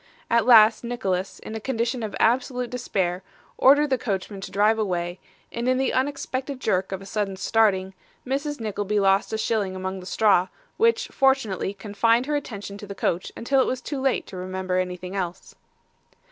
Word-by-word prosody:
At 235 0 +3
last 225 -2 +7
Nicholas, 195 -6 -2
in - - -9
a 220 - -4
condition 235 +1 -2
of 215 -2 -4
absolute 250 +1 +1
despair, 190 -7 -1 0.4
ordered 290 +2 +5
the 260 - +2
coachman 195 -2 -3
to 195 - -6
drive 210 +3 +2
away, 175 -3 -2 0.3
and 235 +2 -2
in 255 - +3
the 265 - 0
unexpected 265 0 -2
jerk 190 -6 0
of 190 0 -4
a - - -11
sudden 200 -1 -2
starting, 190 -2 +2 0.3
Mrs. 280 +2 -2
Nickleby 210 -1 -1
lost 195 +1 +2
a 220 - -1
shilling 215 -4 -1
among 190 0 -4
the 180 - -10
straw, 195 -3 +3 0.3
which 460 +1 +2
fortunately 250 -8 +1
confined 225 +4 +1
her 295 +1 -1
attention 205 -8 -5
to 205 - -9
the 200 - -7
coach 175 -2 -1
until 265 +3 +2
it - - +1
was 255 - -1
too 270 +2 -5
late 265 -1 +1
to 190 - -9
remember 185 0 -2
anything 180 +1 -4
else. 180 -3 -4
215 Hz, 180 wpm, -24 LUFS, 190-250 Hz, 0.4 s, last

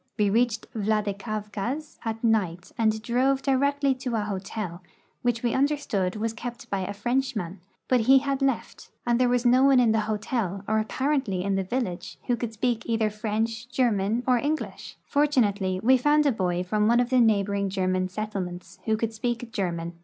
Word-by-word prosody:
M'e 205 -2 +2
reached 230 -1 +1
Vladikavkaz 215 +5 -2
at 225 -1 -4
night 185 -6 0
and 220 -1 +1
drove 265 +3 +1
direct!}^ 280 0 +1
to 250 -3 -2
a 220 - +1
hotel 195 -3 -4 0.4
which 240 -1 0
we 235 - +1
understood 265 -10 0
was 220 +1 -2
kept 245 +2 -7
by 195 - 0
a 190 +1 -3
Frenchman, 210 -4 -2 0.3
but 255 - +3
he 260 +4 +6
had 275 0 0
left, 270 0 -2 0.2
and 240 0 +2
there 250 - +4
was 245 0 +1
no 250 +2 +5
one 275 -2 +6
in 235 -3 +4
the 220 - +2
hotel, 210 -3 -2
or 220 +1 +2
apparently 255 -4 -1
in 200 +1 0
the 195 - +1
vil 245 +8 -1
lage, 185 -4 -6
who 245 - +1
could 235 -1 -4
speak 230 +1 -1
either 225 -2 +1
French, 225 +2 -2
German, 230 -2 +1
or 250 -2 +3
English. 305 +4 -3
For 290 +1 +2
tunately 200 -9 +1
we 260 +3 +6
found 295 +4 +3
a 285 - +4
l)oy 180 -5 -1
from 210 +3 +1
one 235 +1 +4
of 245 +1 0
the 255 -1 +5
neighboring 200 -3 +2
German 185 -1 0
settlements 185 -3 -5
who 220 -1 +1
could 225 0 -2
speak 235 +1 -3
German. 175 -6 -2
225 Hz, 185 wpm, -26 LUFS, 200-250 Hz, 0.4 s, he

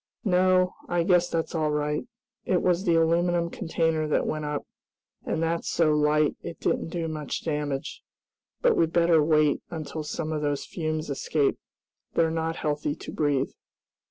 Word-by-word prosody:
"No, 185 -1 +3 0.2
I 175 -1 +2
guess 175 -1 +3
that's 165 -1 -2
all 155 -2 +1
right. 150 0 -1 0.4
It 180 - +1
was 180 +2 +2
the 170 -2 +3
aluminum 170 +1 +2
container 160 -3 0
that 150 - +1
went 155 -1 -2
up, 150 -1 -3 0.6
and 165 - 0
that's 165 +1 -1
so 160 -2 +3
light 150 0 +3
it 165 - -7
didn't - - 0
do 165 0 -3
much 155 -2 -4
damage. 150 -3 -3 0.6
But - - +5
we'd 165 -1 +2
better 170 -2 +4
wait 155 -1 +3
until 160 -2 -5
some 155 +1 -4
of 155 -1 -2
those 145 -1 -1
fumes 155 -2 -3
escape. 140 +1 0 0.6
They're 165 -1 +3
not 165 0 -1
healthy 150 -1 -1
to - - -8
breathe." 145 -3 0
160 Hz, 160 wpm, -26 LUFS, 150-170 Hz, 0.6 s, But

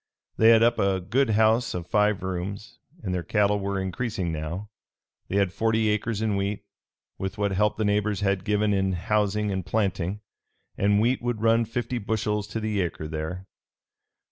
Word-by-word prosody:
They 110 - +5
had 115 0 +7
up 120 0 +3
a 95 -1 +2
good 115 +8 +1
house 110 +2 +3
of 85 -1 -4
five 105 +1 +1
rooms, 95 +3 -5 0.2
and 95 - -2
their 90 - -1
cattle 105 +4 +1
were 100 0 -2
increasing 95 -1 -2
now. 85 +7 -5 0.6
They - - -4
had 100 -2 +2
forty 110 +1 +1
acres 105 +1 -1
in 110 -2 +1
wheat, 100 +1 -2 0.6
with 95 +2 -4
what 100 -1 0
help 105 +2 +1
the 110 - 0
neighbors 105 -1 +1
had 100 -1 +1
given 105 0 +1
in 95 -1 +1
housing 105 +3 0
and 95 -1 -2
planting; 95 -1 -1 0.5
and 100 +1 +2
wheat 120 +4 +2
would 120 -2 -2
run 115 +1 +4
fifty 120 +2 -3
bushels 105 -1 -1
to 110 +2 -4
the 110 -2 -1
acre 85 -3 -3
there. 80 +4 -5
105 Hz, 175 wpm, -26 LUFS, 95-110 Hz, 0.6 s, had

